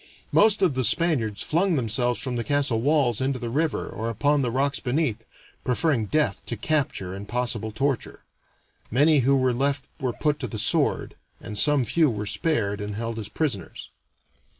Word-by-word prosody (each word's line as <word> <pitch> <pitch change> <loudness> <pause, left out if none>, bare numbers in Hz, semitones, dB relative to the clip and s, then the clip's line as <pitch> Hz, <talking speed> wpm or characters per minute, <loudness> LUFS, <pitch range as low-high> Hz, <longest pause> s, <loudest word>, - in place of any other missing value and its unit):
Most 210 -1 +4
of 175 -6 +3
the 130 0 -1
Spaniards 120 - +1
flung 175 +3 +1
themselves 120 -1 0
from 130 -2 -3
the 120 - -1
castle 145 -5 +1
walls 135 -4 +2
into 135 0 0
the 120 -2 -5
river 155 +4 -1
or 115 +1 -4
upon 145 +6 +1
the 125 - 0
rocks 140 +3 0
beneath, 125 -4 -1 0.4
preferring 125 -3 +1
death 150 -6 0
to 120 - -3
capture 125 -8 -1
and 100 +1 -7
possible 120 -2 -1
torture; 135 +3 -2 0.7
many 145 +5 +4
who 135 +2 +3
were 130 -1 +2
left 140 +2 -1
were 130 -3 -1
put 150 +2 0
to 125 - -3
the 110 - -6
sword, 105 - +1 0.3
and 105 - -8
some 140 +4 +3
few 155 +7 +3
were 105 -3 -3
spared 105 - -1
and 105 0 -4
held 115 +1 -4
as 105 -1 -5
prisoners. 105 - -3
125 Hz, 175 wpm, -25 LUFS, 115-145 Hz, 0.7 s, Most